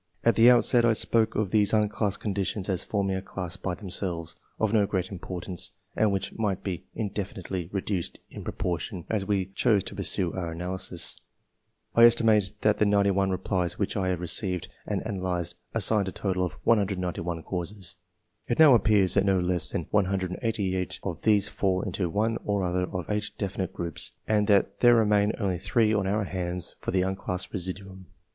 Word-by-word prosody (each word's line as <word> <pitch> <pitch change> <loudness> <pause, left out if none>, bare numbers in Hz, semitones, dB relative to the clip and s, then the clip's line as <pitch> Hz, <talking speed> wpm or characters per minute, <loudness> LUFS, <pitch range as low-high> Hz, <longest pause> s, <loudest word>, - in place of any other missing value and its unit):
At 115 - +5
the 115 +2 +7
outset 120 0 +6
I 115 -1 +4
spoke 110 0 +1
of 105 -3 0
these 105 -1 +3
unclassed 105 -1 +1
conditions 100 -1 -2
as 95 -2 0
forming 100 -2 -1
a 95 - -2
class 90 -2 -5
by 95 -1 -3
themselves, 90 -4 -4 0.2
of 110 -1 0
no 105 -3 +4
great 95 -1 -2
importance, 90 -1 -4 0.2
and 110 -2 +3
which 95 -1 -2
might 105 -4 -2
be 90 -4 -4
indefinitely 95 -4 -4
reduced 95 -2 -3
in - - -8
pro - - -4
portion 90 +1 -3
as 105 -3 -1
we 100 -3 +1
chose 105 -3 +2
to - - -6
pursue 90 -3 0
our 85 -3 -4
analysis. 90 0 -3 0.7
I 115 - +8
estimate 110 -4 +4
that 105 -1 +2
the 105 - +4
91 100 -1 +3
replies 90 -1 -1
which 100 - -1
I 95 -3 0
have 90 -2 -1
re - - -3
ceived 90 0 0 0.2
and' - - -2
analysed 90 -5 -2 0.2
assign 105 -3 +2
a - - -2
total 95 -2 -1
of - - -10
191 90 -6 0
causes. 90 0 -4 0.5
It 120 - 0
now 155 -4 +8
appears 105 -4 +4
that 100 - +4
no 95 -2 +2
less 90 -1 +1
than - - -2
188 95 0 -1
of 85 -5 -4
these 105 -3 +3
fall 95 -2 0
into 90 -2 -2
one 110 +5 0
or 100 -2 0
other 90 0 0
of 90 -3 -5
8 105 0 -1
definite 95 -3 -3
groups, 85 -2 -6
and 105 -1 +2
that 100 -2 +2
there 120 -1 +6
remain 105 -1 +3
only 95 -5 -1
3 110 +3 +2
on 100 -3 +1
our 105 +2 +1
hands 90 -2 -2
for - - -5
the 95 -1 +2
unclassed 95 -1 -3
residuimi. 95 0 -5
95 Hz, 180 wpm, -27 LUFS, 90-105 Hz, 0.7 s, I